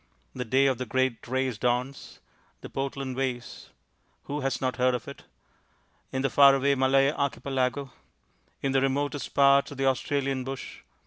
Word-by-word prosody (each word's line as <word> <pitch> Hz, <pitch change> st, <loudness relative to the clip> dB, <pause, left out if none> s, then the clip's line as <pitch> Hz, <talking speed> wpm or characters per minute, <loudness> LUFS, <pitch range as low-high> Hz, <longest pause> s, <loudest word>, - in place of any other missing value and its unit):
The 125 Hz, -1 st, -4 dB
day 130 Hz, +4 st, +3 dB
of 130 Hz, -3 st, +1 dB
the 130 Hz, -, -4 dB
great 130 Hz, 0 st, -1 dB
race 130 Hz, -3 st, -1 dB
dawns. 125 Hz, +3 st, -2 dB, 0.4 s
The -, -, -10 dB
Portland 135 Hz, -1 st, -4 dB
Vasel 125 Hz, -2 st, -4 dB, 0.6 s
Who 145 Hz, +1 st, -4 dB
has 135 Hz, 0 st, -1 dB
not 130 Hz, -1 st, -2 dB
heard 125 Hz, 0 st, +2 dB
of 120 Hz, -, -6 dB
it? -, -, -10 dB, 0.9 s
In 130 Hz, 0 st, -2 dB
the 135 Hz, -, +2 dB
far 140 Hz, -1 st, +7 dB
away 140 Hz, +1 st, +2 dB
Malay 135 Hz, +1 st, +3 dB
Archipelago... 135 Hz, -2 st, -2 dB, 0.7 s
in 135 Hz, -, +1 dB
the 135 Hz, 0 st, +2 dB
remotest 140 Hz, +1 st, -2 dB
parts 140 Hz, 0 st, +5 dB
of 145 Hz, -, -10 dB
the 135 Hz, -, 0 dB
Australian 135 Hz, 0 st, 0 dB
bush... 135 Hz, +1 st, -7 dB
135 Hz, 165 wpm, -27 LUFS, 130-140 Hz, 0.9 s, far